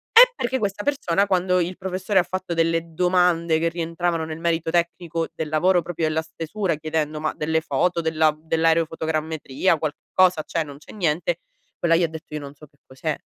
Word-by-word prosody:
Eh - - +9
perché 260 - -1
questa 205 0 -2
persona 200 -9 +1
quando 185 -1 +2
il 175 +1 -2
professore 190 +1 0
ha 175 - +3
fatto 185 -2 -4
delle 165 0 0
domande 175 -2 +2
che 165 - +1
rientravano 165 0 -2
nel 160 0 -6
merito 165 -1 0
tecnico 170 -1 -1
del 160 -2 -4
lavoro, 175 +4 +3
proprio 170 -1 -3
della 155 +1 0
stesura 165 +3 -3
chiedendo: 155 0 -2
"Ma 155 0 -1
delle 160 +1 0
foto 170 +4 0
della 155 -1 +2
dell'aerofotogrammetria 160 -1 0
qualcosa, 160 +3 +1
cioè 165 - -1
non 145 -2 -10
c'è 145 - -14
niente?" 175 -2 0 0.4
Quella 165 -1 +3
gli 175 - +3
ha 170 - +3
detto: 160 -1 -10
"Io 150 - -2
non 140 -1 -9
so 150 +1 -15
che 145 - -34
cos'è." 145 +3 -4
165 Hz, 185 wpm, -23 LUFS, 155-180 Hz, 0.4 s, Eh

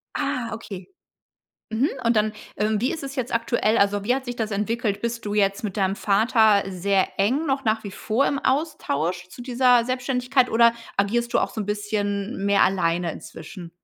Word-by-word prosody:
Ah, 235 -2 -2
okay. 210 - -8 0.8
Mhm, 230 +7 +1
und 230 0 +2
dann, 215 0 +2 0.2
ähm, 210 0 +1
wie 255 - +1
ist 310 - -5
es 275 +1 -6
jetzt 250 -2 -3
aktuell? 230 -1 +1
Also, 200 0 +2
wie 245 +4 +2
hat 265 0 -3
sich 245 -1 -4
das 220 -2 -3
entwickelt? 210 0 -1
Bist 235 -1 -3
du 205 - -2
jetzt 200 0 +1
mit 200 -3 -3
deinem 195 0 +1
Vater 215 0 +3
sehr 190 +1 +1
eng 260 +11 +2
noch 270 0 0
nach 220 0 0
wie 205 - -5
vor 225 +7 0
im 280 - 0
Austausch 180 - -1
zu 245 - -11
dieser 245 -1 +3
Selbständigkeit 255 +1 0
oder 235 +1 +5 0.2
agierst 235 +4 0
du - - +4
auch - - 0
so 220 - -4
'n - - -5
bisschen 205 0 -2
mehr 200 0 +3
alleine 175 -2 +1
inzwischen? 170 +2 -10
220 Hz, 190 wpm, -24 LUFS, 200-245 Hz, 0.8 s, oder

